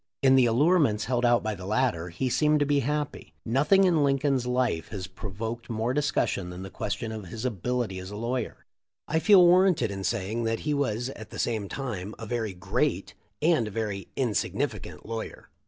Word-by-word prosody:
In 135 -1 +6
the 130 -2 +5
allurements 135 - +3
held 125 0 0
out 120 -1 +4
by 110 0 -1
the 95 -2 -8
latter 105 -6 0
he 95 +10 -2
seemed 150 +4 +3
to - - +4
be 145 0 +2
happy. 150 +2 -3
Nothing 145 - +4
in 170 -5 +3
Lincoln's 135 -2 +1
life 125 -9 0
has 95 -4 -6
pro 95 +3 -8
voked 115 +4 -5
more 115 +2 -1
discussion 140 -10 0
than 90 +1 -7
the 95 - -8
question 110 +2 -3
of 110 -4 -7
his 110 +7 -6
ability 120 -3 -2
as 95 0 -8
a 105 - -7
lawyer. 120 +2 -3 0.4
I 160 +2 +1
feel 190 0 +7
warranted 175 - +4
in 95 -1 -5
saying 115 +2 -1
that 115 0 -1
he 150 - -1
was 125 -4 -1
at 110 -5 -9
the - - -9
same 110 -4 -1
time 110 -7 -5
a 115 - -7
very 110 -2 -2
great 90 - -1 0.3
and 155 -9 +3
a - - -4
very 105 -2 -3
insignificant 120 -6 -2
lawyer. 115 0 -6
120 Hz, 195 wpm, -27 LUFS, 105-135 Hz, 0.4 s, feel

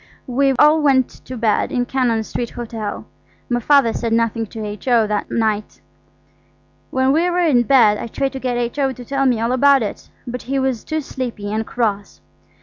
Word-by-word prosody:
We 270 +1 +1
all 300 +4 +4
went 265 -3 +3 0.2
to 255 - -7
bed 220 -2 +1
in 245 -1 0
Cannon 245 -4 0
Street 235 +2 -4
Hotel. 225 -3 -6 0.4
My 240 -1 +1
Father 255 -2 +3
said 230 -1 -2
nothing 230 -1 0
to 220 0 -7
H.O. 220 +2 +1
that 210 0 -2
night. 215 -2 -1 1.1
When 260 0 +1
we 330 +5 +2
were 355 0 +1
in 265 -7 +4
bed 235 -5 +4
I - - -5
tried 270 +3 -2
to 265 - -5
get 250 -2 -2
H.O. 265 +3 -1
to 250 -1 -11
tell 275 +1 0
me 245 -3 +2
all 230 +2 0
about 275 0 +4
it, 205 - -6 0.2
but 250 0 -5
he 270 +2 -3
was 265 -4 -1
too 315 0 -2
sleepy 235 -7 -5
and 220 +1 -2
cross. 205 -4 -2
245 Hz, 190 wpm, -19 LUFS, 225-270 Hz, 1.1 s, all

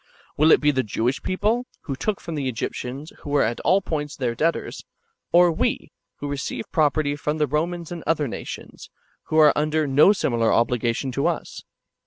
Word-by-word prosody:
Will 155 +2 +4
it - - +6
be 150 0 +4
the 130 -2 +1
[Jewish] 120 +4 -1
people, 220 +6 0
[who 135 - -4
took] 205 +8 -2
from 170 - -7
the 140 -4 -2
Egyptians, 130 +4 -5
who - - -9
were 145 -1 +3
at 115 +2 -1
all 185 +5 +2
points 150 -4 -3
their 125 -3 -1
debtors; 165 +7 -2 0.5
or 175 0 +6
we, 160 - -1 0.2
[who 145 - -6
receive 145 0 -4
property] 150 -2 +1
from 150 +1 -2
the 150 - +2
Romans 165 +4 -2
and 175 -2 -6
other 155 -3 +1
nations, - - -8 0.4
who 155 - -1
are 155 -2 +7
under 155 +1 +1
no 145 +7 +6
similar 120 - +1
obligation 120 +2 +1
to 140 +3 0
us - - -3
150 Hz, 185 wpm, -23 LUFS, 135-160 Hz, 0.5 s, are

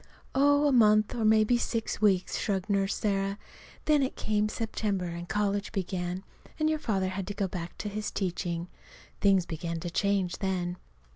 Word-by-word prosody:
"Oh, 285 +2 +4
a 290 - +4
month, 215 -4 +5
or 230 - -2
maybe 220 +2 +4
six 230 -2 -2
weeks," 195 -4 +2
shrugged 200 -1 -1
Nurse 195 0 +1
Sarah. 195 -1 0 0.5
"Then 300 -2 +4
it 265 - -1
came 210 0 0
September 210 -4 -2
and 170 0 -6
college 205 -1 0
began, 185 -2 -3 0.4
and 310 - +2
your 310 0 +1
father 195 -8 0
had 190 0 -4
to 205 - -4
go 200 -1 0
back 175 -2 -6
to - - -4
his 210 +1 -3
teaching. 175 -2 -2 0.5
Things 195 -3 +4
began 165 0 -4
to 175 0 -4
change 195 -1 0
then." 180 -3 -1
200 Hz, 170 wpm, -29 LUFS, 185-215 Hz, 0.5 s, month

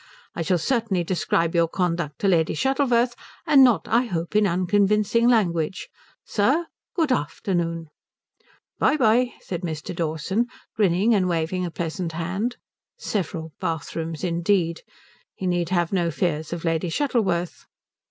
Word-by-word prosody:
I - - -4
shall 180 +2 +2
certainly 220 -2 0
describe 170 -1 0
your 170 -1 +3
conduct 170 -4 -2
to 200 - +2
Lady 165 -4 +2
Shuttleworth, 250 - +2 0.3
and 275 -2 +7
not, 230 -10 +3
I 235 +3 +3
hope, 175 -3 -4
in 210 -1 +4
unconvincing 205 +5 +2
language. 180 -7 +1 0.4
Sir, 270 +11 +1 0.3
good 320 -6 +1
afternoon." 165 -1 -1 0.9
"By - - +3
bye," 245 0 +3
said 175 -2 -5
Mr. 165 +1 -5
Dawson, 170 +8 -1 0.3
grinning 205 +2 +3
and 185 -4 +2
waving 175 +2 -1
a - - -4
pleasant 165 +1 -4
hand. 190 +9 -2 0.4
Several 165 -5 -3
bathrooms 160 0 -4
indeed! 170 -1 +1 0.5
He 190 - -5
need 175 -2 0
have 175 -1 0
no 175 -3 +1
fears 160 -2 -2
of 170 0 -4
Lady 165 +1 0
Shuttleworth. 185 - -1
180 Hz, 135 wpm, -24 LUFS, 165-215 Hz, 0.9 s, and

